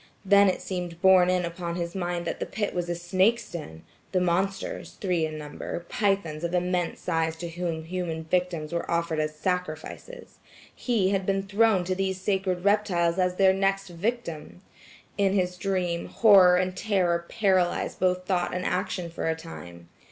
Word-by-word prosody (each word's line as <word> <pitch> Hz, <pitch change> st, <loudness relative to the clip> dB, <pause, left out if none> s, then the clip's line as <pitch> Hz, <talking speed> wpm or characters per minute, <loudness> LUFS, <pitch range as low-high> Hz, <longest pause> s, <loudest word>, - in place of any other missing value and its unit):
Then 200 Hz, 0 st, +6 dB
it 185 Hz, -, -2 dB
seemed 175 Hz, -3 st, -5 dB
borne 185 Hz, -1 st, +6 dB
in 180 Hz, -1 st, +1 dB
upon 170 Hz, 0 st, -4 dB
his 170 Hz, -1 st, -3 dB
mind 175 Hz, -2 st, -3 dB
that -, -, -3 dB
the -, -, -3 dB
pit 205 Hz, -1 st, -3 dB
was 175 Hz, -1 st, -2 dB
a 175 Hz, -, -1 dB
snake's 190 Hz, +7 st, +1 dB
den; 80 Hz, -, -8 dB, 0.3 s
the 185 Hz, -, +3 dB
monsters–three 180 Hz, -1 st, -1 dB
in 155 Hz, 0 st, -7 dB
number–pythons 170 Hz, +2 st, -2 dB
of 170 Hz, +1 st, -1 dB
immense 180 Hz, -1 st, -1 dB
size 165 Hz, -2 st, 0 dB
to 170 Hz, +1 st, -6 dB
whom 165 Hz, -1 st, -3 dB
human 165 Hz, -1 st, -4 dB
victims 170 Hz, -2 st, -1 dB
were 170 Hz, -, -3 dB
offered 170 Hz, -2 st, 0 dB
as 155 Hz, 0 st, -1 dB
sacrifices. 180 Hz, -, -5 dB, 0.4 s
He 215 Hz, -7 st, +1 dB
had 195 Hz, -2 st, -1 dB
been 195 Hz, 0 st, +1 dB
thrown 200 Hz, -1 st, +3 dB
to 185 Hz, +1 st, -1 dB
these 190 Hz, 0 st, -2 dB
sacred 190 Hz, -2 st, -1 dB
reptiles 190 Hz, -4 st, +2 dB
as 180 Hz, 0 st, +1 dB
their 190 Hz, 0 st, +5 dB
next 195 Hz, 0 st, 0 dB
victim. 175 Hz, -3 st, -4 dB, 0.6 s
In 195 Hz, -1 st, +3 dB
his 180 Hz, -2 st, 0 dB
dream, 180 Hz, -2 st, -1 dB
horror 190 Hz, -5 st, +6 dB
and 185 Hz, 0 st, -1 dB
terror 180 Hz, -5 st, +1 dB
paralyzed 190 Hz, -4 st, +1 dB
both 185 Hz, 0 st, +1 dB
thought 180 Hz, -2 st, 0 dB
and 180 Hz, -, -3 dB
action 180 Hz, -2 st, -2 dB
for 165 Hz, -, -2 dB
a 160 Hz, -, 0 dB
time. 85 Hz, -, -10 dB
180 Hz, 165 wpm, -26 LUFS, 170-195 Hz, 0.6 s, Then